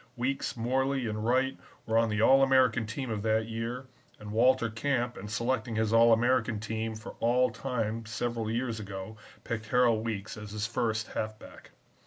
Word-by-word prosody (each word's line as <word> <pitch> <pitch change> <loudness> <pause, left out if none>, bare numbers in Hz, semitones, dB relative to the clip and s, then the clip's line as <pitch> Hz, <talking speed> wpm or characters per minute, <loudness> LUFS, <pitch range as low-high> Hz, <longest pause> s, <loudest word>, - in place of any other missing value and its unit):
Weekes, 135 +1 -2
Morley, 130 +2 0
and 110 -1 -3
Wright 130 +3 +2 0.3
were 110 - -1
on 115 0 +4
the 105 +1 +1
All 135 +3 +6
American 130 -4 +3
team 120 +2 -4
of 105 -2 -2
that 110 +1 +1
year, 115 +3 -4 0.3
and 105 0 -9
Walter 120 +2 +3
Camp 120 +1 -1
in 105 - -8
selecting 115 +1 -1
his 110 0 +1
All 115 0 +6
American 120 -1 +2
team 110 +1 -3
for 110 - -8
All 125 +2 +3
Time 115 -3 -3
several 115 -1 -2
years 115 -1 -2
ago 100 0 -7 0.3
picked 110 -3 -4
Harold 120 -2 +3
Weekes 110 -2 -4
as 105 -1 -8
his 105 0 -2
first 110 -2 -1
halfback. 110 0 -6
115 Hz, 175 wpm, -29 LUFS, 110-125 Hz, 0.3 s, All